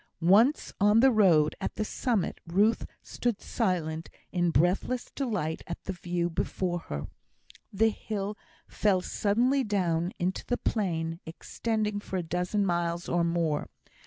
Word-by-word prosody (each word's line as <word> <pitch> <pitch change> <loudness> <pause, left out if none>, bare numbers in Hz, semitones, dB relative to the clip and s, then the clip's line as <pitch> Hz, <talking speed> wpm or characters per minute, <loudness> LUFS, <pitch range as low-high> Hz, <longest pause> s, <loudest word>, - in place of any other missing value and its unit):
Once 240 +9 +4
on 210 +2 +5
the 265 +2 +6
road, 175 -9 +4
at - - -3
the 215 - -1
summit, 225 -5 -1
Ruth 205 +6 +2 0.2
stood 240 -4 -2
silent, 165 -7 -1 0.2
in 175 -1 +1
breathless 180 - +1
delight 210 - -2
at 170 - -6
the 190 - -4
view 175 -1 -2
before 175 +1 -2
her. 75 0 -3 0.7
The 220 +3 +3
hill 205 -1 -4 0.3
fell 195 -3 +2
suddenly 240 +9 +1
down 180 -5 0
into 180 +2 -1
the 245 - -1
plain, 165 -6 -1
extending 215 +5 -2
for 190 -2 -4
a 180 - -1
dozen 180 +5 0
miles 170 -1 -1
or 175 0 +1
more. 170 -3 0
185 Hz, 140 wpm, -29 LUFS, 170-215 Hz, 0.7 s, the